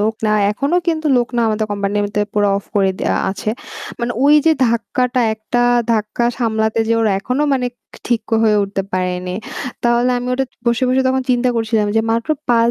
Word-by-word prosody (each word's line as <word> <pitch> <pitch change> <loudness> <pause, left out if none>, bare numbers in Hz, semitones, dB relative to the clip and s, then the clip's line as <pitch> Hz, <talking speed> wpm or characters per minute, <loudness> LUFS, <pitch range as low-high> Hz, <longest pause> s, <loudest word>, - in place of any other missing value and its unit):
লোকরা 220 0 0 0.2
এখনও 280 +11 0
কিন্তু 315 -1 0
লোক 240 0 +1
না। - - +2
আমাদের 215 0 -1
কোম্পানিতে 205 +1 -1
পুরা 205 -1 +2
off 200 - -5
করে 195 -1 +3
দেওয়া - - 0
আছে। 200 +2 -3 0.5
মানে 235 +1 -1
ঐ - - +3 0.2
যে 320 - +6
ধাক্কাটা, 245 +2 0
একটা 225 +3 -1 0.3
ধাক্কা 215 +2 -1
সামলাতে 220 -1 0
যে - - +3
ওরা 220 -2 +2
এখনও 250 +7 -1
মানে 250 -2 0
ক - - -55 0.3
ঠিক 235 -2 +1 0.2
হয়ে 215 -1 +4
উঠতে 195 0 -2
পারে 185 -1 0
নি। 180 - -3 0.5
তাহলে 240 +1 +3
আমি 245 - -5
ওটা 270 +1 0 0.2
বসে, 235 +1 +1
বসে, 255 +1 +2
তখন 260 0 +1
চিন্তা 250 0 +2
করছিলাম 220 -2 0
যে - - +5
মাত্র 230 +3 -1 0.2
৫ 235 0 +4
225 Hz, 190 wpm, -18 LUFS, 210-245 Hz, 0.5 s, যে